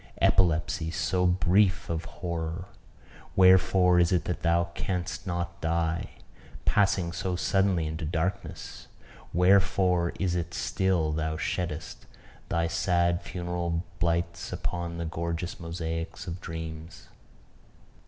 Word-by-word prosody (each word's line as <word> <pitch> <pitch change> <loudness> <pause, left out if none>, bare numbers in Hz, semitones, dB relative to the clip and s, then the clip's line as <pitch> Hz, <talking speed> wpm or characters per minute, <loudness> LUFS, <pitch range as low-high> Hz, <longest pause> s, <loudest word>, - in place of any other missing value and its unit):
Epilepsy 85 -2 +2
so 90 +2 +1
brief 90 +2 +3
of 80 -1 -3
horror 85 +1 -4 0.7
wherefore 95 -1 +6
is 85 -1 +4
it 90 - +2
that 90 - -3
thou 85 -1 +3
canst 90 +1 -3
not 85 -1 -3
die? 85 +2 0 0.6
Passing 95 -4 +2
so 90 +1 -2
suddenly 95 -2 +2
into 80 +1 -4
darkness, 85 +4 -3 0.4
wherefore 90 -1 +3
is 95 -3 +1
it 85 -1 -1
that 85 - -7
still 90 -3 +1
thou 80 0 -1
sheddest 85 -1 -4 0.4
thy 85 0 +1
sad 85 +1 +1
funeral 85 -2 -3 0.2
blights 85 0 -1
upon 85 -1 -3
the 85 - -3
gorgeous 85 +2 -3
mosaics 80 -1 -4
of 90 +2 -6
dreams? 80 0 -7
85 Hz, 115 wpm, -28 LUFS, 85-90 Hz, 0.7 s, wherefore